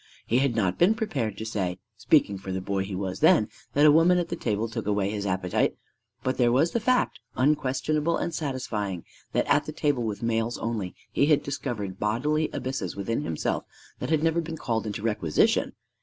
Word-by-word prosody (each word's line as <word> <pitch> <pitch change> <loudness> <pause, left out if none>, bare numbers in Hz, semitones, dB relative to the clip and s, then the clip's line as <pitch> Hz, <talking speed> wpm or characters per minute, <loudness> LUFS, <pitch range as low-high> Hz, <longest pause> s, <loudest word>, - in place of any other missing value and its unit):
He 120 - +2
had 135 -3 +1
not 95 -5 0
been 190 +6 +5
prepared 140 - -2
to 110 - -5
say 95 -5 -2 0.2
speaking 100 -1 +2
for 95 0 -6
the 95 - -1
boy 95 +1 -1
he 100 - -6
then - - -3
was 95 -2 -3
that 140 +6 +3
a 150 - +8
woman 165 +4 +5
at 175 - -1
the 170 - -2
table 110 -6 -1
took 110 - -5
away 100 -1 +1
his 100 -1 -3
appetite; 90 -1 0 0.5
but 130 0 -1
there 120 -1 +4
was 140 +7 +3
the 235 - 0
fact, 250 +3 +1 0.2
unquestionable 145 +3 +1
and 170 - -2
satisfying, 110 - -3 0.3
that - - +2
at - - +3
the - - -5
table 145 -4 0
with 110 -1 -3
males 115 0 0
only 110 -5 -3 0.2
he 140 - +2
had 150 -2 +4
discovered 120 -9 -4
bodily 150 +9 +1
abysses 135 +1 -3
within 105 +6 -2
himself 80 - -2 0.4
that - - -4
had 160 -1 +2
never 165 +1 +2
been 160 0 -6
called 115 -6 -2
into 105 0 -4
requisition! 95 -9 +2
115 Hz, 200 wpm, -26 LUFS, 100-150 Hz, 0.5 s, a